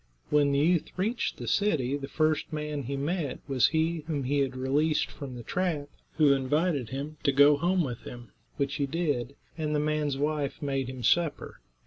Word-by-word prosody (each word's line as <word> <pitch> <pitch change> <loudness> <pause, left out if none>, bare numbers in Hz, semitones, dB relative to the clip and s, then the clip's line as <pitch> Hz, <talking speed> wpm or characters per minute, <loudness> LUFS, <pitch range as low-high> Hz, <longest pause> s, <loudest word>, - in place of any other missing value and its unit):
When 145 -1 +4
the 140 - +2
youth 165 +3 +3
reached 220 +6 -1
the - - -7
city, 150 -11 +1
the 140 -1 -5
first 155 +1 0
man 150 -1 -3
he 135 +2 -4
met 150 0 -2
was 130 -4 +4
he 160 +2 0
whom 145 -4 -1
he 140 +3 +1
had 135 -2 0
released 145 +4 +1
from 135 -3 -8
the 120 - -8
trap, 160 -2 -1 0.2
who 150 -3 +5
invited 140 -1 0
him 145 +4 -5
to 140 - +3
go 145 +2 +6
home 175 +4 +1
with 125 -5 -4
him, 120 -1 -10 0.3
which 140 -1 -1
he 140 - 0
did, 140 -4 -1 0.2
and 150 -1 -1
the - - +2
man's 150 -2 0
wife 145 -1 -1
made 135 -3 -2
him 130 -2 -7
supper. 160 - +1
145 Hz, 190 wpm, -28 LUFS, 135-155 Hz, 0.3 s, go